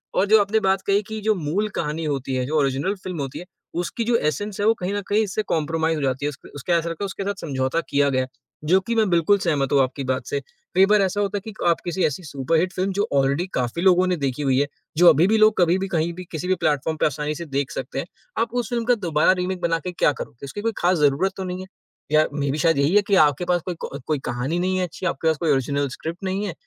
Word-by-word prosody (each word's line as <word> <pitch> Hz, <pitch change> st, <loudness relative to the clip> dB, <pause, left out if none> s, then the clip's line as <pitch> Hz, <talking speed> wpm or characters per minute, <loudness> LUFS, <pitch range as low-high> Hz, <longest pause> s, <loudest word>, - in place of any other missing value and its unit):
और 185 Hz, -, +3 dB
जो 220 Hz, +1 st, +6 dB
आपने 205 Hz, +2 st, +1 dB
बात 195 Hz, -2 st, +1 dB
कही 200 Hz, +1 st, +3 dB
कि 220 Hz, -1 st, -5 dB
जो 215 Hz, +1 st, +2 dB
मूल 185 Hz, +5 st, -1 dB
कहानी 160 Hz, +1 st, -2 dB
होती 135 Hz, -3 st, -2 dB
है, 130 Hz, -1 st, 0 dB
जो 155 Hz, +4 st, -1 dB
ओरिजिनल 140 Hz, +8 st, 0 dB
फिल्म 180 Hz, -3 st, -5 dB
होती 135 Hz, -2 st, -5 dB
है, 180 Hz, -, -9 dB, 0.3 s
उसकी 175 Hz, +7 st, -2 dB
जो 235 Hz, +1 st, +1 dB
एसेंस 205 Hz, +5 st, -2 dB
है 205 Hz, -, +1 dB
वो 225 Hz, -, +6 dB
कहीं 185 Hz, -1 st, -3 dB
न 205 Hz, -, -1 dB
कहीं 215 Hz, +2 st, +2 dB
इससे 210 Hz, +1 st, -2 dB
कॉम्प्रोमाइज़ 160 Hz, 0 st, 0 dB
हो 150 Hz, -, -3 dB
जाती 135 Hz, +1 st, -1 dB
है। -, -, +1 dB
उसक 145 Hz, -1 st, -11 dB
उसके 145 Hz, +4 st, -4 dB
ऐसा 170 Hz, 0 st, +1 dB
लगता 165 Hz, +4 st, -5 dB
है, -, -, 0 dB
उसके 195 Hz, 0 st, -5 dB
साथ 200 Hz, 0 st, -4 dB
समझौता 135 Hz, +1 st, -1 dB
किया 140 Hz, 0 st, +3 dB
गया, 130 Hz, -1 st, 0 dB, 0.4 s
जो 180 Hz, +5 st, +4 dB
कि 230 Hz, +4 st, -3 dB
मैं 220 Hz, -3 st, +3 dB
बिल्कुल 175 Hz, +3 st, +4 dB
सहमत 145 Hz, -7 st, 0 dB
हूँ 140 Hz, -, +5 dB
आपकी 130 Hz, +2 st, -3 dB
बात 130 Hz, 0 st, -2 dB
से। 140 Hz, -, -1 dB, 0.4 s
कई 190 Hz, +1 st, +7 dB
बार 210 Hz, +1 st, +4 dB
ऐसा 195 Hz, +1 st, 0 dB
होता 205 Hz, 0 st, -1 dB
है -, -, -5 dB
कि -, -, -14 dB
आप 170 Hz, -, +4 dB
किसी 180 Hz, +1 st, -1 dB
ऐसी 150 Hz, +5 st, -2 dB
सुपर 145 Hz, +1 st, -1 dB
हिट 180 Hz, +3 st, 0 dB
फिल्म 190 Hz, +1 st, -1 dB
जो 205 Hz, +3 st, 0 dB
ऑलरेडी 140 Hz, +4 st, +2 dB
काफ़ी 125 Hz, +6 st, -1 dB
लोगों 185 Hz, 0 st, +4 dB
ने 180 Hz, -, +1 dB
देखी 140 Hz, -1 st, -2 dB
हुई 135 Hz, -1 st, +2 dB
है। 145 Hz, -, +2 dB, 0.3 s
जो 175 Hz, +1 st, +6 dB
अभी 165 Hz, +3 st, +5 dB
भी 220 Hz, +2 st, +3 dB
लोग 215 Hz, 0 st, +5 dB
कभी 175 Hz, 0 st, +4 dB
भी, 195 Hz, -, -2 dB
कहीं 170 Hz, -2 st, 0 dB
भी, 180 Hz, +1 st, -8 dB
किसी 165 Hz, +2 st, -4 dB
भी 185 Hz, -, +2 dB
प्लेटफॉर्म 155 Hz, -1 st, 0 dB
पे -, -, +1 dB
आसानी 150 Hz, +1 st, -1 dB
से 170 Hz, -, -6 dB
देख 140 Hz, -2 st, -2 dB
सकते 130 Hz, +1 st, -4 dB
हैं। 140 Hz, -, -3 dB, 0.3 s
आप 230 Hz, 0 st, -1 dB
उस 245 Hz, -4 st, -1 dB
फिल्म 235 Hz, -1 st, -1 dB
का 245 Hz, +1 st, +4 dB
दोबारा 165 Hz, -8 st, +2 dB
रीमेक 180 Hz, 0 st, -3 dB
बनाके 165 Hz, +1 st, -1 dB
क्या 170 Hz, -, +2 dB
करोगे? 125 Hz, 0 st, -8 dB
उसकी 140 Hz, +9 st, -6 dB
कोई 230 Hz, +2 st, 0 dB
खास 180 Hz, +1 st, +2 dB
ज़रूरत 150 Hz, +6 st, +2 dB
तो 190 Hz, -, -3 dB
नहीं 185 Hz, 0 st, -4 dB
है। 190 Hz, -, -9 dB, 0.4 s
या 155 Hz, 0 st, +5 dB
मेबी 140 Hz, 0 st, -1 dB
शायद 165 Hz, 0 st, +2 dB
यही 140 Hz, +7 st, +2 dB
है 210 Hz, -, +7 dB
कि 200 Hz, -, +3 dB
आपके 145 Hz, +3 st, +1 dB
पास 175 Hz, -1 st, +1 dB
कोई 180 Hz, -, -3 dB
को 140 Hz, -, -5 dB
कोई 155 Hz, -2 st, 0 dB
कहानी 130 Hz, +8 st, -2 dB
नहीं 185 Hz, +1 st, 0 dB
है 185 Hz, -, +1 dB
अच्छी, 180 Hz, +1 st, -6 dB
आपके 165 Hz, -2 st, -1 dB
पास 160 Hz, -1 st, +2 dB
कोई 160 Hz, 0 st, +1 dB
ओरिजिनल 140 Hz, +1 st, +1 dB
स्क्रिप्ट 170 Hz, +4 st, -6 dB
नहीं 195 Hz, +2 st, -1 dB
है। 190 Hz, -, -4 dB
170 Hz, 275 wpm, -23 LUFS, 145-195 Hz, 0.4 s, कई